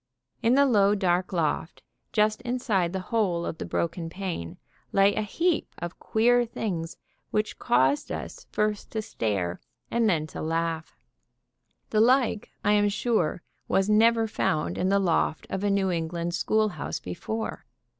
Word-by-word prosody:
In 235 +3 +4
the 280 +1 +6
low, 205 -5 +4
dark 180 -2 +1
loft, 165 -1 -1 0.3
just 215 +1 +2
inside 240 -8 0
the 190 - -2
hole 180 -7 +1
of 160 - -5
the - - -4
broken 165 0 -2
pane, 175 - -5 0.3
lay 195 +1 +4
a 215 - -1
heap 335 - -1
of 175 0 -6
queer 245 +2 +3
things 185 -8 -4 0.3
which 215 0 -1
caused 130 +4 +2
us - - -6
first 210 -1 -1
to 220 -1 -2
stare, 95 - -2 0.3
then 210 -10 +2
to - - -7
laugh. 165 0 -2 0.9
The 215 - +3
like, 245 -2 +3
I 205 - +3
am 205 0 +4
sure, 205 -6 0 0.2
was 195 +2 +2
never 225 +1 +5
found 155 -7 -1
in 185 - +1
the 200 - +4
loft 170 -4 +1
of 190 - -2
a 205 - +2
New 195 -1 +2
England 170 0 -2
sehoolhouse 200 -2 0
before. 220 - -5
195 Hz, 150 wpm, -27 LUFS, 165-220 Hz, 0.9 s, the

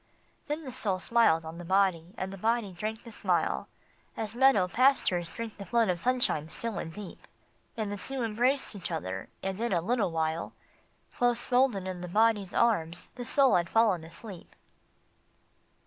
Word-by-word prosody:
Then 300 +2 -3
the 265 - -6
Soul 210 -6 -1
smiled 185 -6 +3
on 160 +2 -7
the - - -7
Body, 185 -1 +1
and 190 +1 -4
the - - -7
Body 225 -1 0
drank 215 +5 -5
the 230 - -10
smile, - - 0 0.5
As 220 -1 -3
meadow 240 -7 +4
pastures 190 -7 +2
drink 230 -2 -7
the 200 - -6
flood 230 -3 +2
of 175 -1 0
sunshine 245 -10 +1
still 225 +1 -3
and 165 - -5
deep; 195 +2 -10 0.5
And 215 -2 -2
the 205 - -3
two 260 +6 -4
embraced 240 +3 0
each 195 - -5
other, 95 - -4
and 195 +2 -3
in 235 - 0
a 175 - +3
little 220 +3 +1
while, 160 0 -2 0.6
Close 245 -1 +1
folded 245 -6 +2
in 185 -1 -5
the 180 - -5
Body 220 +3 +3
s 190 - -11
arms, 175 -8 +1
the 250 - -6
Soul 270 +1 +4
had 175 -1 +1
fallen 215 -7 +3
asleep. 170 +3 -10
205 Hz, 180 wpm, -29 LUFS, 175-235 Hz, 0.6 s, meadow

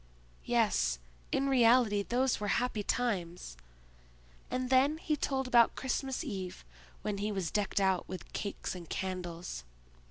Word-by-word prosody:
"Yes, - - +2 0.3
in 275 - +1
reality 235 -5 +5
those 250 +5 +1
were 210 - -2
happy 225 +1 +1
times." 185 - -2 0.9
And 255 0 -2
then 275 +4 +4
he 315 -1 0
told 270 -2 -1
about 235 -2 +5
Christmas 265 +2 -2
Eve, 190 - -5 0.4
when 205 -2 -2
he 210 +1 -1
was 190 -5 -2
decked 205 -1 0
out 190 -2 +1
with 185 -1 -8
cakes 200 -2 -3
and 175 -3 -9
candles. 175 - -4
210 Hz, 135 wpm, -32 LUFS, 185-255 Hz, 0.9 s, reality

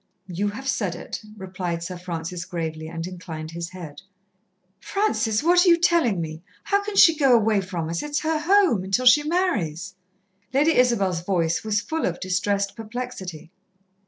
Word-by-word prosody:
"You 190 +2 -2
have 225 +7 -6
said 205 -9 -1
it," 175 - -7 0.2
replied 185 -3 -4
Sir 180 +2 -5
Francis 175 -1 -5
gravely, 160 -3 -5
and 165 0 -5
inclined 165 -3 -7
his 170 0 -5
head. 175 -6 -10 0.8
"Francis, 265 - 0
what 350 +2 +5
are 370 - +4
you 340 - +6
tellin' 330 - +2
her? 155 +1 -9 0.2
How 400 0 +1
can 415 0 -5
she 330 -4 +7
go 275 -5 +4
away 215 -3 +3
from 180 -4 -4
us? 170 +1 -2
It's 295 0 -2
her 315 0 0
home, 345 - +3
until 195 +7 0
she 250 +4 +7
marries." 295 - -1 0.6
Lady 300 +4 +4
Isabel's 200 -9 +2
voice 170 -3 0
was 210 -1 0
full 320 0 -2
of 175 - -3
distressed 200 +2 -1
perplexity. 220 -8 -7
195 Hz, 165 wpm, -24 LUFS, 170-280 Hz, 0.8 s, she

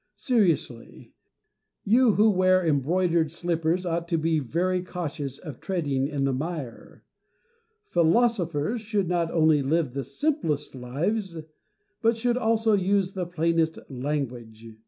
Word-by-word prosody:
Seriously, 195 - -1 0.7
you 235 +2 +4
who 215 +2 +4
wear 185 -1 +3
embroidered 165 +2 +1
slippers 170 +1 -1
ought 170 0 -2
to 170 -1 0
be 160 0 +1
very 180 +7 -1
cautious 150 -7 -5
of 150 -8 -9
treading 145 -8 -1
in 145 -2 -2
the 135 -1 +1
mire. 145 -3 -6 0.8
Philosophers 175 - +1
should 210 -3 -1
not 170 -1 0
only 155 -3 +3
live 145 -1 0
the 140 0 -3
simplest 165 - -2
lives, 165 - -3 0.6
but 230 0 +2
should 240 +1 +1
also 225 -2 +2
use 195 -1 +1
the 180 -2 -3
plainest 165 -1 0
language. 125 -5 -4
170 Hz, 125 wpm, -26 LUFS, 145-195 Hz, 0.8 s, you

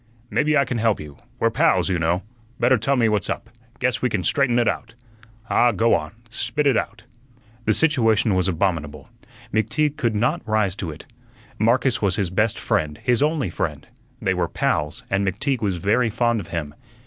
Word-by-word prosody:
"Maybe 150 0 +2
I 140 - +3
can 120 -3 -2
help 110 -3 +2
you. 75 -2 -10 0.2
We're - - +1
pals, - - +2
you 90 -2 0
know. 85 +3 0 0.4
Better 125 0 +4
tell 135 +6 +1
me 120 -3 +3
what's 105 -4 0
up; - - -4 0.3
guess - - 0
we - - +1
can - - -1
straighten 130 -4 +2
ut 120 -1 +2
out. 115 +2 -3 0.5
Ah, 120 +1 +4
go 115 0 +2
on; 75 - -1 0.2
spit 150 +4 -2
ut 135 -3 +4
out." - - -3 0.6
The - - +3
situation 115 -9 +3
was 90 -1 +2
abominable. 80 -6 -2 0.4
McTeague 145 +8 +1
could 120 -7 0
not 110 +4 +1
rise 105 -4 +1
to 90 - -4
it. 75 - -9 0.5
Marcus 125 +3 +2
was 100 -3 +1
his 95 -4 -1
best 105 +3 +1
friend, 75 -1 -1
his 125 +1 +2
only 150 - +1
friend. 75 -5 -4 0.3
They 95 -5 0
were 90 -2 0
"pals" 75 -1 -1
and 95 +1 +1
McTeague 115 +8 -1
was 100 -4 0
very 110 +7 +1
fond 120 +1 +1
of 95 - -7
him. 80 -4 -4
110 Hz, 190 wpm, -22 LUFS, 90-120 Hz, 0.6 s, Better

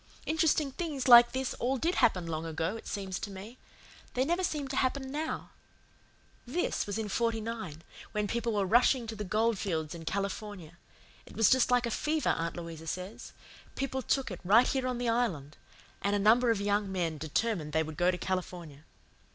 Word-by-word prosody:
Interesting 315 -3 +2
things 290 -4 -3
like 240 -1 +9
this 260 0 -2
all 260 +3 0
did 335 +7 0
happen 185 - +2
long 160 -1 -3
ago, 165 +4 -2
it 225 - -9
seems 195 -2 -4
to 210 - -5
me. 200 +5 -10 0.6
They 255 +1 +2
never 345 +5 0
seem 300 -5 -1
to 265 - -3
happen 265 0 0
now. 310 +2 -4 0.9
This 300 - -1
was 205 - -3
in 220 -1 -2
'49, 220 -7 -2 0.3
when 210 -1 -1
people 235 +1 -1
were 200 -2 +1
rushing 240 +4 +4
to 225 0 -6
the 210 - -4
gold 215 +2 +1
fields 160 -6 -2
in 165 -1 -9
California. 200 -2 -4 0.5
It - - -13
was 225 -3 +5
just 260 -1 +4
like 245 -1 +3
a 235 - -2
fever, 305 +6 0
Aunt 165 +1 -1
Louisa 165 -1 -7
says. 185 +6 -6 0.4
People 265 -1 -2
took 265 -1 0
it, 185 - -6
right 215 +7 +6
here 260 -2 0
on 250 -1 -2
the 245 0 -2
Island; 190 - -1 0.5
and 200 +1 +1
a - - +3
number 225 +4 +4
of 225 -3 +2
young 205 0 0
men 170 -5 -2
determined 160 +1 -1
they 160 +1 +2
would 155 0 -7
go 175 +1 +3
to 180 - 0
California. 175 -5 -4
215 Hz, 190 wpm, -30 LUFS, 180-250 Hz, 0.9 s, like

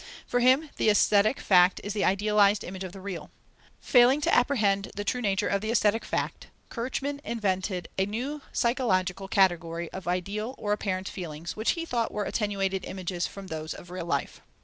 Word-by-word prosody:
For 245 - 0
him 260 +5 +3
the - - +3
aesthetic 210 +3 +4
fact 180 -1 +4
is 205 - -3
the 210 - -1
idealized 205 +1 +3
image 190 +1 -6
of 185 - -6
the 195 - -10
real. 185 -3 -6 0.5
Failing 250 +3 +5
to - - +1
apprehend 210 -7 +2
the 205 - -3
true 250 +4 -1
nature 205 -1 +1
of 200 -1 0
the 220 - -3
aesthetic 225 -1 +2
fact, - - -3 0.2
Kirchmann 270 +4 -3
invented 190 -5 -2
a 190 - +2
new 260 +8 -4
psychological 195 -6 0
category 170 -4 +1
of 190 -2 -8
ideal 200 +7 -2
or 205 0 -1
apparent 190 -2 -2
feelings, 165 -2 -6
which 220 +1 +1
he 335 -1 -4
thought 235 -7 -1
were 210 - -2
attenuated 195 -3 -1
images 180 -2 -3
from 195 -1 -10
those 155 -3 -5
of 175 - -12
real 180 -2 -5
life. - - -2
200 Hz, 180 wpm, -27 LUFS, 185-230 Hz, 0.5 s, Failing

